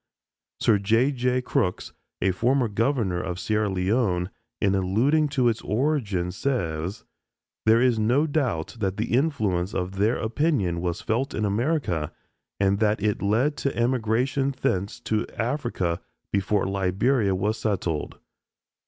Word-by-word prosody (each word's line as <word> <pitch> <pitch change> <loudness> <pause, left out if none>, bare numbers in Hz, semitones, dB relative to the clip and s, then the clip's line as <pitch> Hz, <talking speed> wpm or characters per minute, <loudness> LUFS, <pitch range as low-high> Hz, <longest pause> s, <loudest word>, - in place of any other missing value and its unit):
Sir 105 -3 +3
J. 115 +7 +3
J. 125 -1 0
Crooks, 90 -6 -1 0.3
a 95 - +3
former 125 +6 +2
governor 110 -4 0
of 90 0 -4
Sierra 105 +2 0
Leone, 95 -1 0 0.3
in 100 -2 +2
alluding 115 +12 +2
to 135 -4 +1
its 115 -2 0
origin, 105 - 0
says: 90 - -2 0.6
"There 110 +1 +6
is 120 -2 +3
no 125 +8 +3
doubt 130 - -1
that 95 -2 -1
the 110 +2 -2
influence 110 - +1
of 95 +1 -3
their 105 +4 +2
opinion 110 - 0
was 90 0 -2
felt 130 +5 -1
in 105 - 0
America 105 - 0 0.5
and 100 0 +2
that 105 -1 +2
it 105 -1 0
led 120 +9 +2
to 140 - -2
emigration 125 +3 +1
thence 100 -7 -1
to 110 0 -1
Africa 115 - -1 0.3
before 100 +1 +1
Liberia 95 +3 +1
was 105 +4 -1
settled. 90 -7 -2
110 Hz, 135 wpm, -25 LUFS, 95-125 Hz, 0.6 s, There